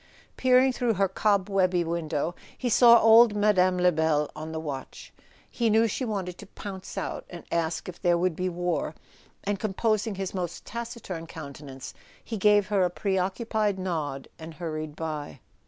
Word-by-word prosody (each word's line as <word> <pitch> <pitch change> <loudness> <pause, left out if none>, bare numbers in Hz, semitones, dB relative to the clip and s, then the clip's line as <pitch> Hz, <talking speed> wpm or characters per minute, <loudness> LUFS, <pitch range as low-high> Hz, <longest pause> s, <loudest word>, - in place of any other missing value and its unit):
Peering 255 0 +4
through 240 -3 0
her 195 +1 +2
cobwebby 190 -2 +1
window, 165 -1 -2 0.2
he 250 - -1
saw 235 0 +7
old 225 -1 +7
Mme. 185 -3 +3
Lebel 160 -4 +2
on 155 +1 -6
the 160 - -3
watch. 145 -4 -7 0.3
He 235 -2 0
knew 220 +1 +4
she 255 +4 -2
wanted 190 -5 -4
to 205 - -10
pounce 195 -2 -8
out - - -3
and 175 -1 -9
ask 165 -1 -1
if 180 -1 -9
there 175 -2 +3
would 180 -1 0
be 185 +2 -1
war; 175 -2 -2 0.5
and 200 -1 -1
com¬ 200 -3 -3
posing 215 -2 +1
his 190 -1 -4
most 175 -3 -4
taciturn 230 -8 -6
countenance 140 -4 -9 0.3
he 230 - -5
gave 205 0 +4
her 205 -2 +2
a 180 - +3
preoccupied 200 +3 -1
nod 155 -7 -3
and 160 0 -9
hurried 155 -2 -5
by. 150 -4 -5
185 Hz, 165 wpm, -27 LUFS, 160-210 Hz, 0.5 s, saw